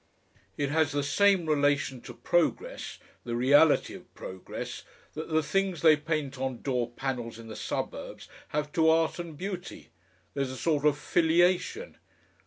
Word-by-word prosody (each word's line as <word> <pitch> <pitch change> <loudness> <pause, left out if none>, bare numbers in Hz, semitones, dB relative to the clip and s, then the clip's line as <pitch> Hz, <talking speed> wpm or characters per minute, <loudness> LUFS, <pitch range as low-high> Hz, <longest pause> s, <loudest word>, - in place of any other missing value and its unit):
"It 145 -1 -1
has 155 -2 +2
the 145 -1 0
same 190 +4 +3
relation 145 -4 +1
to 120 -1 -10
progress 300 - -1 0.3
the 120 -1 -3
reality 145 +5 +4
of - - -12
progress 95 0 -7 0.3
that 155 +2 -6
the 160 -1 +2
things 195 -1 -1
they 160 -2 +8
paint 150 -3 -3
on 130 -2 -3
door 125 -4 0
panels 120 -2 -4
in 115 -1 -11
the 110 - -7
suburbs - - -5 0.2
have 150 0 -2
to 160 0 +3
art 160 +1 +2
and 165 -3 -6
beauty. 185 0 -6 0.4
There's 135 -2 -1
a 130 - -6
sort 150 -1 +1
of 145 -1 +2
filiation.... 175 - +1
150 Hz, 155 wpm, -28 LUFS, 135-165 Hz, 0.4 s, they